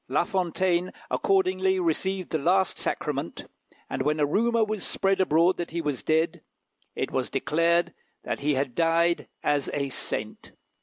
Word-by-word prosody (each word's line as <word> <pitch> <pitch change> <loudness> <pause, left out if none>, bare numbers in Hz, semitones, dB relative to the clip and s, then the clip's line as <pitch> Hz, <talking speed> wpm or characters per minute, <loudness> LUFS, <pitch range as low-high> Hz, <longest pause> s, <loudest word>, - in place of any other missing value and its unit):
La 135 +6 +2
Fontaine 180 0 0 0.2
accordingly 190 0 +2
received 185 +2 -1
the 160 - 0
last 185 +5 +2
sacrament; - - -3 0.4
and 135 - -3
when 150 +3 +1
a 145 - +4
rumour 230 +9 +2
was 215 -2 -3
spread 195 -1 +1
abroad 175 +1 +3
that 175 - -4
he 170 - -3
was 145 -6 -2
dead, 160 +1 +1 0.5
it - - -2
was - - -1
declared 170 +2 +1 0.3
that - - -3
he 145 0 +1
had 135 -2 -1
died 170 +3 +2 0.2
as 145 -2 +1
a 140 -1 -1
saint. 110 -4 -5
170 Hz, 155 wpm, -26 LUFS, 150-190 Hz, 0.5 s, a